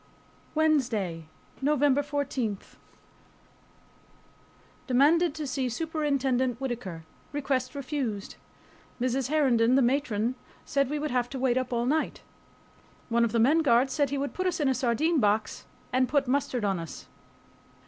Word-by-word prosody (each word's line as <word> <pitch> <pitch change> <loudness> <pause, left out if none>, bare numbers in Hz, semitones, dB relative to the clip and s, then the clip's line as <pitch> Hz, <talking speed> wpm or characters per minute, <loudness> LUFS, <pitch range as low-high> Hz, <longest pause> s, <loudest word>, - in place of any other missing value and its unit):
WEDNESDAY, 235 - +1 0.3
NOVEMBER 285 0 +3
14. 280 -7 -2 2.3
Demanded 295 +5 +4
to 310 - -4
see 260 -1 -1
Superintendent 270 -4 0
Whittaker. 230 -11 -5 0.3
Request 270 -2 -2
refused. 260 -7 -3 0.7
Mrs. 255 +1 0
Herndon, 255 -6 +3
the 270 - +4
matron, 240 -3 +1 0.3
said 275 -2 +1
we 300 - -1
would 300 0 -3
have 245 -1 0
to 270 - -5
wait 250 -1 +2
up 255 -1 -4
all 235 0 0
night. 305 +5 -1 0.9
One 235 0 +3
of 230 - +1
the 235 - 0
men 280 +8 +4
guards 265 -3 +3
said 285 -2 +1
he 280 - -2
would 280 +1 -3
"put 370 0 -1
us 345 -2 -1
in 275 -3 +2
sardine 275 +7 +1
box 215 -1 0 0.3
and 255 0 +2
put 285 -2 +1
mustard 255 -4 0
on 195 -3 0
us." 165 -1 -8
260 Hz, 140 wpm, -28 LUFS, 235-290 Hz, 2.3 s, Demanded